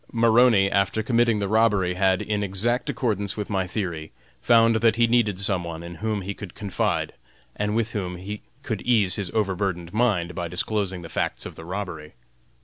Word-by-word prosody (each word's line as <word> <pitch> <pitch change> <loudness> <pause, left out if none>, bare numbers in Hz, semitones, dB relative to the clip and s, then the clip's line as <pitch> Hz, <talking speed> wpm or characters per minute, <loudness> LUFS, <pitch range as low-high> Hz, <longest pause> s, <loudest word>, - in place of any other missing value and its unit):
Maroney, 115 -3 +5
after 100 +2 +1
committing 115 -1 +2
the 100 -1 -1
robbery, 105 -4 +2
had, 95 0 +2
in 105 -1 -1
exact 105 +5 0
accordance 105 -5 -1
with 105 0 -4
my 95 -2 0
theory, 85 -5 -4 0.3
found 115 -1 +5
that 110 0 +3
he 115 0 +4
needed 115 -5 +2
some 95 -3 +1
one 85 -1 -6
in 85 0 -8
whom 110 -2 -1
he 100 +2 -4
could 100 -3 -10
confide, 100 -3 -1 0.4
and 105 +1 -1
with 115 0 0
whom 95 -5 -3
he 100 +4 -7 0.2
could 110 -8 -3
ease 110 -7 +3
his 100 -4 -2
overburdened 95 -4 -1
mind 105 -7 +1
by 90 -1 -3
disclosing 95 +1 -1
the - - -7
facts - - -2
of - - -7
the 80 - -11
robbery. 90 -5 -6
100 Hz, 185 wpm, -24 LUFS, 90-110 Hz, 0.4 s, Maroney